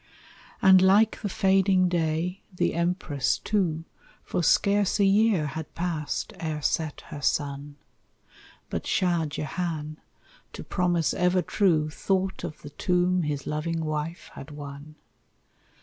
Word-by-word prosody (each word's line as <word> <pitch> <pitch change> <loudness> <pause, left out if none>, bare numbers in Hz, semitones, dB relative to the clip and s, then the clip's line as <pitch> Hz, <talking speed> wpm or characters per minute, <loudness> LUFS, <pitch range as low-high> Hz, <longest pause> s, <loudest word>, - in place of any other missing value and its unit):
And 190 -1 +8
like 200 +4 +4
the 205 - -2
fading 190 -1 +3
day, 170 +2 -1
the 180 - 0
Empress, 170 -5 0
too, 170 -6 -1 0.4
For - - -2
scarce 200 +4 +3
a 200 - +5
year 200 -4 +3
had 155 +1 -6
passed 165 -4 -3
ere 155 -2 -3
set 155 -1 -1
her 145 - -7
sun, 145 0 -1 1.0
But - - -3
Shah 175 -4 +1
Jehan, 155 +1 -4 0.5
to - - -7
promise 175 -3 0
ever 180 0 +2
true, 160 -7 +1
Thought 190 +3 -1
of 165 -4 -7
the 145 - -9
tomb 180 +3 +1
his 150 -3 -3
loving 160 +2 -2
wife 155 +3 -4
had 135 - -10
won. 145 0 -9
170 Hz, 130 wpm, -26 LUFS, 150-185 Hz, 1.0 s, And